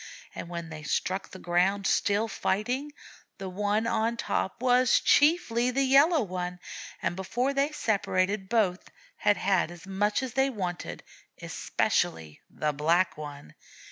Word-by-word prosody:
And 170 - -7
when 170 -1 -6
they 155 -1 -8
struck 185 +5 -2
the - - -10
ground, 185 +3 +1
still 205 +3 +2
fighting, 245 +8 -2 0.5
the 195 - -6
one 205 +3 0
on 230 0 0
top 195 - -2
was 250 0 +4
chiefly 285 -6 +3
the 270 +2 +1
Yellow 280 +3 +5
One; 180 -2 -4 0.5
and - - 0
before 245 +8 -1
they 280 +2 +1
separated 195 -6 0
both 200 -6 +1 0.3
had 205 -1 +2
had 190 -4 +1
as 175 0 -11
much 205 +5 0
as 255 -3 -5
they 270 0 +2
wanted, 185 -8 -5 0.4
especially 80 -2 -1
the 150 -1 -2
Black 165 +3 +2
One! 145 -2 -9
200 Hz, 140 wpm, -28 LUFS, 180-245 Hz, 0.5 s, Yellow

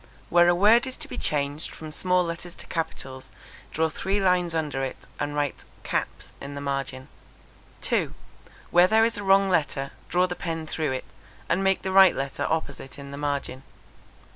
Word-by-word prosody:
Where 175 0 +6
a 175 - +4
word 220 +7 +5
is 260 - -4
to 305 - -4
be - - -6
changed 145 +1 -1
from 155 -1 -8
small 180 +3 +2
letters 170 +1 -5
to - - -6
capitals, 135 -5 -5 0.4
draw 160 +1 +1
three 190 +6 -1
lines 180 -3 +2
under 150 -4 -1
it, 135 - -3 0.2
and 145 0 -2
write 145 -2 -2 0.2
caps. - - -3
in 140 +1 -7
the - - -4
margin. 135 -2 -3 0.7
2. - - 0 0.6
Where 175 +1 +6
there 220 +3 +5
is 230 -2 -1
a - - -5
wrong 195 0 +5
letter, 145 -5 0 0.2
draw 180 +1 +3
the 180 - -3
pen 165 -2 -4
through 155 -3 -2
it, 130 - -4 0.4
and 185 +3 +1
make 195 0 +2
the 190 - -2
right 190 -1 +7
letter 135 0 -2
opposite 145 -4 -3
in 140 -1 -9
the 140 - -7
margin. 140 -2 -2
160 Hz, 185 wpm, -26 LUFS, 140-185 Hz, 0.7 s, right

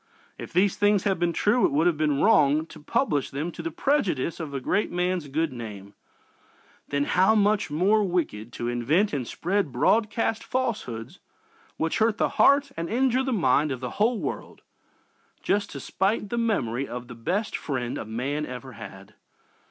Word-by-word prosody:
If - - -7
these 185 +2 +2
things 205 -1 +3
had 195 -4 0
been 175 0 +1
true 210 +8 +2
it - - +4
would 150 +4 +2
have 175 -2 +3
been 150 -2 +1
wrong 155 -8 +4
to 160 - -13
publish 145 -1 0
them 150 +6 -3
to - - -8
the 330 - -3
prejudice 270 - 0
of 160 -4 -5
a 140 - -3
great 200 +10 0
man's 180 -2 -1
good 155 +1 -1
name 105 -4 -8 0.9
then 140 0 0
how 190 +8 +3
much 210 -2 +2
more 195 +8 +3
wicked 160 - -2
to 120 - -4
invent 145 - +1
and 130 -5 -2
spread 190 -3 -1
broadcast 215 - +1
falsehoods 220 - -3 0.6
which 160 0 -1
hurt 220 -1 +2
the - - +1
heart 280 0 +4
and 165 0 -4
injure 255 +2 +2
the 265 0 -2
mind 150 - +2
of 130 - -3
the 125 -1 -5
whole 230 +2 +3
world - - -6 0.8
just 200 0 0
to 140 - -7
spite 195 - -1
the 235 - -2
memory 135 - 0
of 125 0 -7
the 125 - -9
best 185 - -2
friend 125 -4 -3
a - - -4
man 125 +7 -3
ever 130 +1 -8
had! 100 -3 -11
165 Hz, 180 wpm, -26 LUFS, 130-210 Hz, 0.9 s, it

